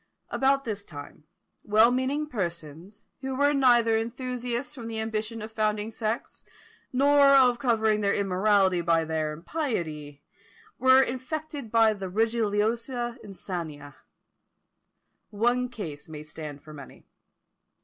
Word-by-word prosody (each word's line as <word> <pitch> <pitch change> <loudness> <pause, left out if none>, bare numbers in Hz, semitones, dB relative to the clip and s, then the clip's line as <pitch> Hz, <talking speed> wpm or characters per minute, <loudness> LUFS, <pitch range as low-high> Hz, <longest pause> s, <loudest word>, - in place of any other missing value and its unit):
About 275 +1 +2
this 205 -3 -4
time, 150 -2 -11 0.4
well 220 +3 +4
meaning 260 +4 0
persons, 175 - -6 0.2
who 265 -1 -4
were 285 +2 +3
neither 240 -5 +4
enthusiasts 245 +2 -3
from 240 -5 -8
the 225 -1 -4
ambition 220 0 -3
of 220 - -8
founding 215 0 -1
sects, 220 +1 -4 0.5
nor 280 +2 +5
of 250 -3 +5
covering 220 -4 +2
their 200 -1 +2
immorality 195 -1 +2
by 165 -1 +2
their 155 -1 -2
impiety, 155 - -4 0.6
were 260 +1 +6
infected 280 +1 -5
by 225 -1 +5
the 195 -2 -6
religiosa 230 +3 -1
insania. 170 -7 -7 1.4
One 240 +4 +1
case 160 - -8
may 150 -1 -8
stand 150 -2 -8
for 155 - -12
many. 140 -3 -12
220 Hz, 120 wpm, -27 LUFS, 180-250 Hz, 1.4 s, were